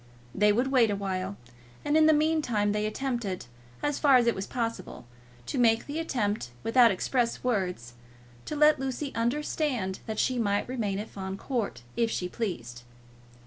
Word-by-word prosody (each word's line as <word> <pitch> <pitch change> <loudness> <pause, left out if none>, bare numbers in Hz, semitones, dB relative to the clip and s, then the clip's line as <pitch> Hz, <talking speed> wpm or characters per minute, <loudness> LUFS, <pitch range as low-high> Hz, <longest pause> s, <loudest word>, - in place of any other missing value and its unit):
They 210 +1 +4
would 245 +5 +1
wait 245 -5 +4
awhile, 195 -1 -3 0.5
and 290 - +1
in 315 0 +6
the - - +7
meantime 300 -9 +2
they 210 0 0
attempted, 215 - -3 0.4
as 290 -1 0
far 280 -3 +5
as 245 -2 +5
it 235 - +3
was 190 - -5
possible 230 - -4 0.4
to 255 - -3
make 225 -2 +3
the 295 +3 -4
attempt 215 - -1
without 235 +1 +6
express 235 +4 0
words, 180 - -1 0.5
to 305 - -4
let 300 0 +5
Lucy 270 +1 -3
understand 240 -4 -1
that 220 -1 -4
she 255 +2 +1
might 205 -2 0
remain 220 -6 -2
at 210 +2 -4
Fawn 190 0 -5
Court 220 - -3
if 230 -1 +1
she 180 - -2
pleased. 145 - -5
230 Hz, 165 wpm, -28 LUFS, 200-265 Hz, 0.5 s, the